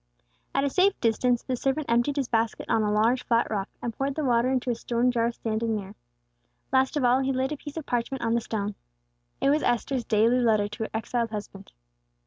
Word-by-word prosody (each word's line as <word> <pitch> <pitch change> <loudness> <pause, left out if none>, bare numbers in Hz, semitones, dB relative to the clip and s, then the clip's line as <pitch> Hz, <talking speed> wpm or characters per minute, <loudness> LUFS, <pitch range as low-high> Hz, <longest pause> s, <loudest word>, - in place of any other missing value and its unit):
At 275 - +2
a 280 - +1
safe 385 +4 +3
distance 240 +1 +1
the 260 - -2
servant 270 +4 -1
emptied 240 +5 +2
his 275 -4 -1
basket 225 -1 0
on 225 - +2
a 210 -1 +1
large 225 +4 +2
flat 235 -1 +2
rock, 200 -2 -2
and 235 - -2
poured 270 +3 -2
the 310 - -2
water 240 0 +3
into 255 -1 0
a - - -1
stone 240 +2 0
jar 235 -1 +1
standing 225 -1 -2
near. 200 -1 -6 0.8
Last 265 +3 +3
of 285 - 0
all, 250 +1 +4
he 270 0 0
laid 260 +1 -1
a 300 - -3
piece 290 +2 -9
of 315 - -4
parchment 245 +2 -2
on 230 0 +1
the 235 - +2
stone. 210 -3 -3 0.7
It 275 - +4
was 300 +1 +2
Esther's 245 +1 0
daily 230 +3 +3
letter 220 -4 +3
to 215 +2 -5
her - - -7
exiled 230 +1 -2
husband. 205 -2 -8
240 Hz, 220 wpm, -26 LUFS, 225-265 Hz, 0.8 s, all